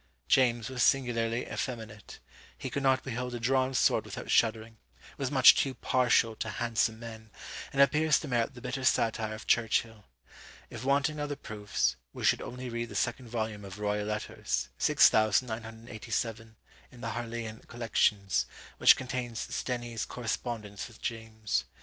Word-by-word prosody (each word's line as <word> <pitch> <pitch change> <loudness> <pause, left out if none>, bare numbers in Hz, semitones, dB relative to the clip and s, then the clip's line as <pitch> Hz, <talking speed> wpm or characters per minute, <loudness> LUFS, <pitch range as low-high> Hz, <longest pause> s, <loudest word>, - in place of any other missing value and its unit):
James 120 -4 +3
was 130 -2 -3
singularly 120 -3 +2
effeminate; 110 -5 -6 0.4
he - - -6
could 140 - -2
not 130 -1 +3
behold 125 -1 -4
a - - -4
drawn 130 +2 +2
sword - - +3
without - - -6
shuddering; 110 -1 +2 0.4
was - - -2
much - - +8
too 135 -1 0
partial 120 -3 +2
to 110 - -4
handsome 115 0 0
men; 110 -1 -9 0.4
and 140 0 +6
appears 150 +1 +3
to 155 - -7
merit 120 0 0
the 120 - -10
bitter 125 +1 -4
satire 110 -3 +1
of 110 - -10
Churchill. 115 -2 +1 0.7
If 115 0 -7
wanting 140 +3 +1
other 145 0 -2
proofs, 105 -5 -2 0.2
we - - -7
should - - +3
only 125 +1 -6
read 115 -1 -4
the - - -9
second 120 +1 -1
volume 110 -3 -3
of 100 0 -9
"Royal 105 0 -1
Letters," 105 -10 -2
6987, 110 0 +1 0.4
in 120 - -14
the 115 - -3
Harleian 115 -1 -5
collections, 105 -4 +1 0.3
which - - +8
contains 125 -3 -4 0.2
Stenie's 120 -3 -3
correspondence 110 -4 -4
with 115 - -16
James. 110 -2 -3
115 Hz, 150 wpm, -30 LUFS, 110-125 Hz, 0.7 s, much